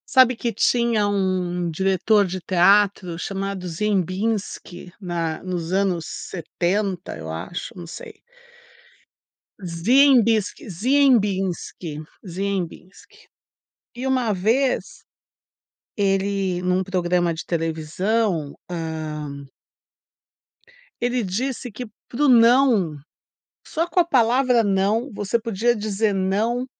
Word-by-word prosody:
Sabe 255 -1 +7
que 230 -1 -2
tinha 230 -1 +2
um 180 -3 -1
diretor 195 +4 +2
de 185 +1 -4
teatro 185 0 +3
chamado 195 0 -4
Ziembinski, 185 0 -2
na 170 -3 -3
nos 180 -2 -4
anos 190 -4 +1
setenta, 185 +2 -3
eu 80 0 -7
acho, 80 - -6
não 175 -2 -9
sei. - - -10 1.4
Ziembiski 225 +5 +3
Ziembinski, 195 - +1 0.2
Ziembinski 190 -1 -6 0.7
e 255 +2 -4
uma 255 -4 +1
vez 230 +8 0 0.9
ele, 195 -2 0
num 180 +1 +1
programa 175 -2 0
de 160 - -6
televisão 165 +1 -1 0.2
hã 155 -4 -5 1.6
ele 245 0 0
disse 245 +6 -3
que 245 +4 -6 0.2
para 255 +5 -2
o - - +5
não, 230 - +5 0.7
só 330 +1 -1
com 355 - +2
a - - +4
palavra 250 -4 +3
não, 205 +6 +1
você 205 +3 -1
podia 230 +1 0
dizer 210 0 0
não 215 +7 0
195 Hz, 100 wpm, -22 LUFS, 175-230 Hz, 1.6 s, Sabe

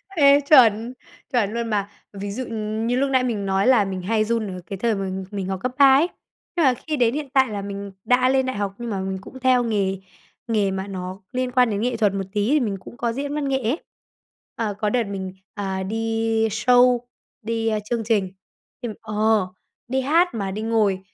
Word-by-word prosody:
Ê, 285 -2 +6
chuẩn, 235 -4 +6 0.4
chuẩn 220 -4 +1
luôn 235 -1 -2
mà! 205 -2 -1 0.2
Ví 200 0 -5
dụ, 255 +5 -4
ừm, 220 0 -3
như 245 - +1
lúc 275 +1 +1
nãy 260 -1 +3
mình 215 -5 -2
nói 195 +3 +1
là 240 -6 +5
mình 190 -1 -4
hay 215 +3 +1
run 230 -1 -1
ở 185 -2 -6
cái 195 - -6
thời 225 +2 +1
mà 195 -1 -3 0.2
mình 195 -2 -3
học 190 -1 -3
cấp 255 - 0
ba 275 -2 +7
ấy, 315 +5 +4 0.5
nhưng 335 - +3
mà 255 - +5
khi 305 - 0
đến 240 -2 +3
hiện 290 -1 -4
tại 265 -2 +4
là 205 - -3
mình 200 0 -6
đã 255 +1 +4
lên 265 0 +2
đại 260 - -2
học, 200 -1 -2
nhưng 240 -1 -5
mà 200 -3 -2
mình 190 0 -3
cũng 260 - -11
theo 255 -1 +3
nghề 200 -4 0 0.5
nghề 210 -4 +1
mà 190 +1 -4
nó 185 0 -6
liên 255 -1 -1
quan 250 -1 +4
đến 205 -1 -1
nghệ 245 0 0
thuật 210 -3 +2
một 195 -1 -2
tí, 210 +2 +1
thì 300 +2 +4
mình 210 -6 -1
cũng 235 - -12
có 235 -1 -1
diễn 285 +3 -3
văn 295 -2 -1
nghệ 270 -1 +1
ấy. 240 +9 +1 0.8
À, 215 -3 -2
có 210 -2 +1
đợt 240 +1 +1
mình, 190 -2 -5 0.2
à, 190 -3 -3
đi 225 +1 0
show, 245 +3 +4 0.4
đi, 225 0 -2
ờ, 215 -1 +1
chương 230 +1 -2
trình, 205 -4 +1 0.5
thì 240 - -3
ờ, 215 -2 +1 0.4
đi 265 +2 0
hát 330 +5 +3
mà 200 -4 -3
đi 210 +3 -4
ngồi 215 -4 +1
225 Hz, 225 wpm, -23 LUFS, 200-250 Hz, 0.8 s, ba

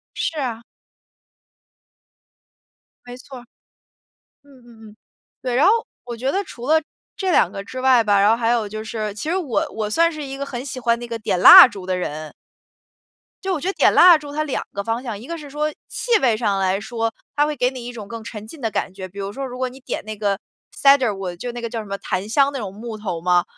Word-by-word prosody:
是 320 -2 -2
啊。 235 -3 -4 2.4
没 245 0 -9
错 260 0 -11
儿。 240 - -16 1.0
嗯 275 -3 -20
嗯 225 -2 -15
嗯， 210 - -19 0.5
对， 250 -2 -2
然 275 - +4
后 400 - +6 0.3
我 240 -1 -6
觉 260 +4 -1
得 395 +5 0
除 245 -8 -9
了 315 +2 +4 0.4
这 380 -2 -1
2 185 - +4
个 195 - -6
之 255 +4 -7
外 255 -3 +5
吧， 205 -2 +3
然 205 - +5
后 - - +5
还 230 -1 0
有 230 -3 +1
就 215 +1 -6
是 215 -2 -4
其 305 +10 -4
实 365 - 0
我 300 -11 -1
我 215 -1 -3
算 335 +8 +3
是 310 - -6
一 270 0 -6
个 280 - -4
很 255 -2 -6
喜 260 -2 -6
欢 235 -1 +1
那 240 - -7
个 230 -1 -5
点 205 -4 -1
蜡 250 - +11
烛 195 -4 -10
的 185 -1 -1
人。 155 -3 -5 1.1
就 385 - -1
我 320 - -2
觉 360 - -4
得 390 - 0
点 - - +3
蜡 350 -2 +8
烛 290 -1 -10
它 305 +1 -2
两 275 - -3
个 200 0 -4
方 230 +2 -2
向。 225 -6 -5
一 235 - -11
个 335 0 -5
是 295 -2 -10
说 300 +2 -1 0.2
气 475 -3 +1
味 235 -5 +3
上 205 -4 0
来 190 +1 +1
说， 225 0 -3 0.2
它 295 0 +3
会 300 -2 -3
给 250 - +2
你 250 -2 -8
一 245 - -5
种 220 -4 -9
更 230 +1 -8
沉 215 -2 -8
浸 285 +4 -12
的 225 -2 -1
感 190 - -3
觉。 190 -1 -7
比 200 - -11
如 200 +1 -5
说， 275 +2 -4
如 250 -1 -7
果 255 0 -1
你 260 +1 -12
点 - - -4
那 215 0 -6
个 200 -1 -1 0.3
Sandalwood， 215 -10 +2
就 245 +7 -5
那 240 0 -7
个 235 - -4
叫 225 -1 -4
什 - - -10
么， 200 0 -5
檀 195 +2 -4
香 280 +4 +3
那 270 - -3
种 195 -3 -6
木 220 +1 -7
头 195 -6 -4
嘛， 175 +1 +2
235 Hz, 280 characters per minute, -21 LUFS, 210-275 Hz, 2.4 s, 蜡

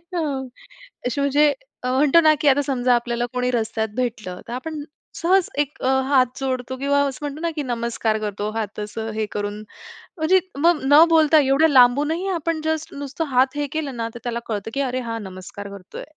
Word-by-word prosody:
हां. 290 -6 -1 0.6
अशी 250 +3 -1
म्हणजे 290 +1 +3 0.3
अ, 250 - -1
म्हणतो 290 +5 +5
ना 310 -1 +6
की 300 - +1
आता 275 +1 +4
समजा 250 -3 +1
आपल्याला 240 0 -1
कोणी 250 0 0
रस्त्यात 225 -2 -1
भेटलं, 220 -8 -3
तर - - -8
आपण 295 +4 -5 0.3
सहज 365 +2 +2
एक 290 0 -2
अ, - - +1 0.2
हात 260 -3 +5
जोडतो 260 -1 -3
किंवा 280 +1 +2
असं 270 -2 -5
म्हणतो 295 +2 -5
ना 335 - 0
की 295 - -2
नमस्कार 235 -3 -1
करतो, 210 0 -3
हात 215 -2 -4
असं 220 +1 -5
हे 220 0 0
करून, 205 0 -3 0.6
म्हणजे 335 +4 +4 0.2
मग 335 +1 +4
न 290 +4 +7
बोलता 315 -1 +5
एवढ्या 285 +3 +4
लांबूनही 290 +8 +4
आपण 330 0 -2
जस्ट 315 0 -2
नुसतं 285 +3 -4
हात 260 +2 +3
हे 290 0 -1
केलं 300 -4 -3
ना, 230 -1 -2
तर 240 - -7
त्याला 235 -1 -2
कळतं 220 0 -4
की 280 - 0
अरे 255 -1 -1
हा 230 - -2
नमस्कार 195 +1 -9
करतोय. 200 -2 -9
265 Hz, 195 wpm, -22 LUFS, 230-295 Hz, 0.6 s, न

